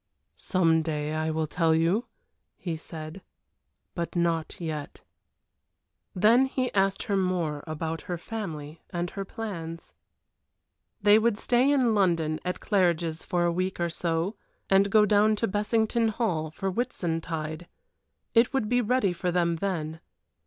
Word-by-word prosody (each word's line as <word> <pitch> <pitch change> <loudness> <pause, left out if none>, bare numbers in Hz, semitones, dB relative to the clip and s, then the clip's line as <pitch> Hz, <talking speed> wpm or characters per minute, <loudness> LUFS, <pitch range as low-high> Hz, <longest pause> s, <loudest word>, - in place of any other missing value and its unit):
"Some 165 -3 +2
day 155 -1 -2
I 155 0 -1
will 160 0 0
tell 160 +1 +2
you," 170 +9 +1 0.5
he 170 -3 -3
said. 160 +2 -8 0.7
"But 170 0 -4
not 170 -2 0
yet." 155 -4 -5 1.1
Then 230 +8 +5
he 255 -1 -2
asked 195 0 +1
her 205 -4 -1
more 175 -6 0
about 160 +1 -3
her 175 - -1
family 165 -7 -6
and 175 0 -3
her 195 - -4
plans. 170 -6 -6 1.1
They 205 +1 +7
would 225 -1 +2
stay 245 +4 +3
in 260 -5 +3
London 165 -6 +1
at 180 0 -3
Claridge's 170 -4 +1
for 175 -1 0
a 170 - +2
week 185 +2 -2
or 170 -1 0
so, 170 +4 -1 0.4
and 195 +1 +5
go 210 +1 +5
down 210 +1 +4
to 225 +2 0
Bessington 220 +3 +1
Hall 185 -8 -1
for 190 +5 -3
Whitsuntide. 165 -7 -3 0.7
It 230 +4 +4
would 250 -6 +1
be 245 +2 +2
ready 230 -5 +2
for 180 +1 -2
them 170 -1 +1
then. 160 -4 -3
175 Hz, 145 wpm, -27 LUFS, 160-210 Hz, 1.1 s, They